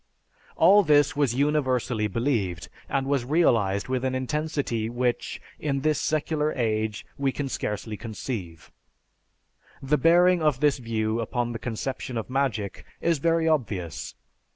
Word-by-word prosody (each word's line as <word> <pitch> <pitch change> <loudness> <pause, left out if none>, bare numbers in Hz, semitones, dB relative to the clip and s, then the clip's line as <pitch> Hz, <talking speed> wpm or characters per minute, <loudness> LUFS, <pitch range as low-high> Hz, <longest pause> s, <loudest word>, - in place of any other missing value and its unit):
All 205 +1 +6
this 145 -5 +3
was 140 -5 +1
universally 130 -6 +1
believed, 105 -6 -1 0.2
and 135 -1 0
was 140 -2 +1
realized 115 - +2
with 130 -1 -1
an 130 0 0
intensity 130 -4 -2
which, 120 0 -1 0.2
in 140 -2 -1
this 155 +1 +1
secular 155 0 0
age, 110 -3 -1
we 135 -1 +1
can 145 +1 -3
scarcely 105 -3 -4
conceive. 100 - -6 1.1
The 145 +3 +1
bearing 175 +1 +5
of 150 -5 +2
this 145 -2 +2
view 110 -1 -1
upon 120 +1 -2
the 115 - -5
conception 120 +2 -4
of 115 +3 -4
magic 130 -7 -1 0.2
is 165 -3 +1
very 165 +1 +2
obvious. 105 - -2
130 Hz, 135 wpm, -26 LUFS, 110-150 Hz, 1.1 s, All